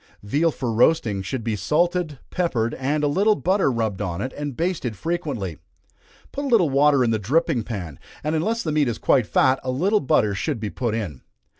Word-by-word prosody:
Veal 145 Hz, +11 st, +1 dB
for 125 Hz, -6 st, -3 dB
roasting 115 Hz, -4 st, +2 dB
should 115 Hz, +5 st, -4 dB
be 110 Hz, -1 st, -1 dB
salted, 165 Hz, -, 0 dB
peppered, 120 Hz, -11 st, 0 dB
and 145 Hz, +3 st, -1 dB
a -, -, +3 dB
little 200 Hz, +8 st, +3 dB
butter 190 Hz, -6 st, +1 dB
rubbed 110 Hz, -5 st, -2 dB
on 90 Hz, -3 st, -3 dB
it, 130 Hz, +5 st, -4 dB
and 145 Hz, -3 st, -5 dB
basted 165 Hz, -, -2 dB
frequently. 135 Hz, -, -3 dB, 0.7 s
Put 285 Hz, -, -4 dB
a -, -, -1 dB
little 205 Hz, -, +3 dB
water 140 Hz, -1 st, +4 dB
in 115 Hz, -, +1 dB
the 110 Hz, -, 0 dB
dripping 130 Hz, -, +1 dB
pan, 90 Hz, -, -6 dB, 0.2 s
and 155 Hz, +2 st, -1 dB
unless 220 Hz, +9 st, 0 dB
the 155 Hz, -, -2 dB
meat 150 Hz, -2 st, +2 dB
is 115 Hz, -2 st, -2 dB
quite 125 Hz, -6 st, +2 dB
fat, 130 Hz, 0 st, +3 dB
a 130 Hz, -, -3 dB
little 185 Hz, +12 st, +2 dB
butter 110 Hz, -, +2 dB
should 130 Hz, +5 st, -2 dB
be 105 Hz, -2 st, -4 dB
put 120 Hz, -4 st, -2 dB
in. 95 Hz, -, -4 dB
135 Hz, 200 wpm, -23 LUFS, 110-165 Hz, 0.7 s, water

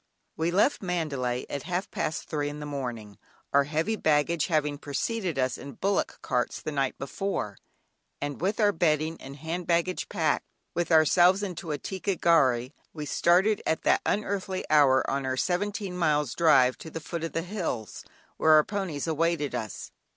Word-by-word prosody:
"John 160 Hz, -, -2 dB
Gilpin." 175 Hz, +1 st, 0 dB
We -, -, +1 dB
left 280 Hz, +8 st, +3 dB
Mandalay 145 Hz, -9 st, -2 dB
at 140 Hz, -, -4 dB
half 180 Hz, +5 st, -3 dB
past 155 Hz, -, -2 dB
three 145 Hz, -1 st, -2 dB
in 145 Hz, +1 st, -7 dB
the 150 Hz, -, -6 dB
morning, 120 Hz, -8 st, -5 dB, 0.3 s
(our 140 Hz, 0 st, +5 dB
heavy 160 Hz, +9 st, 0 dB
baggage 155 Hz, -2 st, +2 dB
having 150 Hz, -4 st, 0 dB
preceded 175 Hz, -, -2 dB
us 130 Hz, -1 st, 0 dB
in 140 Hz, -, -8 dB
bullock 200 Hz, -, -1 dB
carts 125 Hz, -1 st, -1 dB
the 155 Hz, -, -5 dB
night 135 Hz, -2 st, -1 dB
before) 135 Hz, -, -3 dB, 0.6 s
and 145 Hz, 0 st, -4 dB
with 200 Hz, +5 st, 0 dB
our 205 Hz, -2 st, +5 dB
bedding 160 Hz, -2 st, 0 dB
and 135 Hz, +1 st, -9 dB
hand 165 Hz, +4 st, -5 dB
baggage 170 Hz, +1 st, 0 dB
packed -, -, 0 dB, 0.3 s
with 175 Hz, -1 st, -1 dB
ourselves 175 Hz, +5 st, +5 dB
into 180 Hz, -3 st, -5 dB
a 150 Hz, -, -1 dB
"ticca 190 Hz, +5 st, -3 dB
gharry," 130 Hz, -7 st, +3 dB, 0.2 s
we 150 Hz, -2 st, -5 dB
started 180 Hz, +8 st, +3 dB
at 160 Hz, -, 0 dB
that -, -, +3 dB
unearthly 195 Hz, -2 st, -1 dB
hour 140 Hz, -3 st, +5 dB
on 140 Hz, 0 st, -1 dB
our 130 Hz, 0 st, -2 dB
seventeen 195 Hz, +3 st, -1 dB
miles 150 Hz, -6 st, +1 dB
drive 135 Hz, -7 st, +4 dB
to 160 Hz, -, -8 dB
the 160 Hz, -, -6 dB
foot 165 Hz, +1 st, -5 dB
of 165 Hz, -, -4 dB
the 165 Hz, -, -1 dB
hills, 175 Hz, -, -4 dB, 0.3 s
where 155 Hz, -, +5 dB
our 155 Hz, 0 st, +7 dB
ponies 185 Hz, -8 st, -3 dB
awaited 160 Hz, -3 st, 0 dB
us. 110 Hz, -5 st, -5 dB
160 Hz, 180 wpm, -27 LUFS, 140-180 Hz, 0.6 s, our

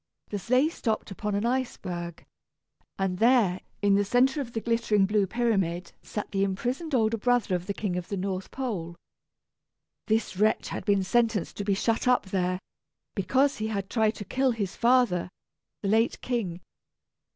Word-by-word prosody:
The 205 Hz, -, -3 dB
sleigh 255 Hz, -, +3 dB
stopped 220 Hz, -10 st, -2 dB
upon 210 Hz, +1 st, -3 dB
an 205 Hz, +3 st, 0 dB
iceberg, 185 Hz, -9 st, -3 dB, 0.7 s
and 190 Hz, -2 st, -1 dB
there 225 Hz, -6 st, +4 dB, 0.2 s
in 200 Hz, -1 st, +4 dB
the 200 Hz, +1 st, +4 dB
centre 255 Hz, +7 st, +3 dB
of 240 Hz, -3 st, -7 dB
the 225 Hz, -, -1 dB
glittering 225 Hz, -3 st, +2 dB
blue 205 Hz, 0 st, +2 dB
pyramid 195 Hz, -6 st, 0 dB
sat 210 Hz, -, -5 dB
the 195 Hz, -1 st, +1 dB
imprisoned 245 Hz, -, -1 dB
older 225 Hz, -1 st, +2 dB
brother 245 Hz, -3 st, +2 dB
of 180 Hz, 0 st, -2 dB
the 200 Hz, -, -1 dB
King 195 Hz, -5 st, -2 dB
of 180 Hz, -, -4 dB
the 200 Hz, -, -3 dB
North 190 Hz, 0 st, -3 dB
Pole. 195 Hz, -11 st, -4 dB, 1.1 s
This 220 Hz, -4 st, 0 dB
wretch 215 Hz, +2 st, +2 dB
had -, -, -5 dB
been 200 Hz, -2 st, +3 dB
sentenced 225 Hz, -1 st, +1 dB
to 205 Hz, -, -2 dB
be 200 Hz, -1 st, +1 dB
shut 225 Hz, +4 st, 0 dB
up 250 Hz, -4 st, +4 dB
there, 185 Hz, -1 st, 0 dB, 0.6 s
because 265 Hz, +8 st, +2 dB
he 215 Hz, -, -1 dB
had 200 Hz, -3 st, -3 dB
tried 220 Hz, -2 st, +2 dB
to 205 Hz, -, -7 dB
kill 265 Hz, +4 st, +1 dB
his 205 Hz, -6 st, -2 dB
father, 235 Hz, -8 st, +3 dB, 0.5 s
the -, -, 0 dB
late 225 Hz, +3 st, +2 dB
King. 200 Hz, -9 st, -2 dB
210 Hz, 170 wpm, -27 LUFS, 190-240 Hz, 1.1 s, there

